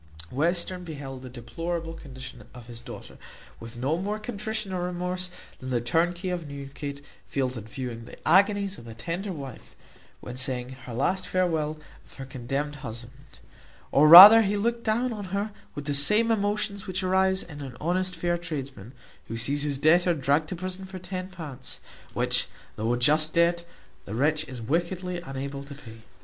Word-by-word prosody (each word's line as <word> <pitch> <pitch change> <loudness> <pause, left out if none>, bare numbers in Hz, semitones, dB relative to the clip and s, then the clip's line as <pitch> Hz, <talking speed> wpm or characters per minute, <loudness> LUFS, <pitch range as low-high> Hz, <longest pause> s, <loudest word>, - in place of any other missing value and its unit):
Western 175 +5 0
beheld 140 -5 -7
the 130 - -9
deplorable 165 +8 -5
condition 130 -6 -10
of 120 -2 -11
his 120 -1 -9
daughter - - -10 0.4
with 115 +1 -8
no 140 +7 0
more 205 +3 -2
contrition 215 -2 -4
or 180 - -2
remorse 180 +1 -2 0.3
than 130 - -7
the 125 -2 +1
turnkey 175 - 0
of 175 -3 -4
Newgate 140 0 -7 0.2
feels 130 -2 -1
at 110 -3 -7
viewing 120 -1 -6
the - - -11
agonies 200 0 +3
of 120 - -13
a 115 - -9
tender 170 - -4
wife, 135 -8 -9 0.4
when 125 0 -8
taking 130 -2 -1
her 125 -2 -10
last 185 +9 0
farewel 160 -4 0 0.3
of - - -20
her 135 - -7
condemned 135 +3 -4
husband; 120 -3 -8 0.8
or 150 +2 +6
rather 195 +8 +13
he 205 -1 0
looked 235 +3 -1
down 235 +3 0
on 205 -2 -6
her 200 +3 -2 0.2
with 145 - -6
the 145 - -1
same 210 +11 +5
emotions 205 -1 -1
which 185 0 -3
arise 190 0 +2
in 145 -3 -10
an 130 -3 -8
honest 180 +3 -1
fair 175 +1 -1
tradesman, 135 - -6 0.3
who 115 - -5
sees 140 +5 +1
his 145 -2 -1
debtor 170 +4 +4
dragged 145 +2 +1
to - - -3
prison 185 +2 -4
for 190 0 -8
£10, 180 -7 -7 0.4
which, - - +1 0.3
though 110 +2 -1
a 120 - +1
just 155 +5 +2
debt, 170 0 +3 0.4
the 105 - -6
wretch 155 +5 +1
is 130 -5 -8
wickedly 175 +6 -2
unable 140 -2 -6
to 140 0 -10
pay. 115 -6 -12
155 Hz, 175 wpm, -27 LUFS, 130-185 Hz, 0.8 s, rather